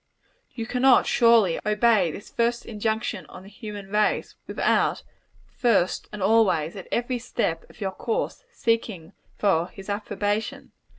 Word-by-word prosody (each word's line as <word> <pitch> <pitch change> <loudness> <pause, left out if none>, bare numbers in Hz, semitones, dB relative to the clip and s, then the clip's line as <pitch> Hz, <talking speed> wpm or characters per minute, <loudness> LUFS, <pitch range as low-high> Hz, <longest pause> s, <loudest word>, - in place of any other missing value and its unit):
You 230 - -6
cannot, 250 +2 +4
surely, 230 -7 +4
obey 210 -3 +3
this 200 +7 -9
first 235 0 0
injunction 220 +1 -2
on 185 - -12
the 195 - -13
human 205 -2 -9
race, 210 0 +1
without - - +1 0.4
first 210 -8 0
and 210 -2 -5
always, 190 -7 +3
at 190 - -8
every 245 +1 -1
step 165 -8 -2
of - - -18
your 195 -1 -1
course, 455 - -3
seeking 225 - -2 0.2
for 175 -5 +2
his 195 +2 -12
approbation. 205 +1 -3
210 Hz, 135 wpm, -25 LUFS, 195-235 Hz, 0.4 s, cannot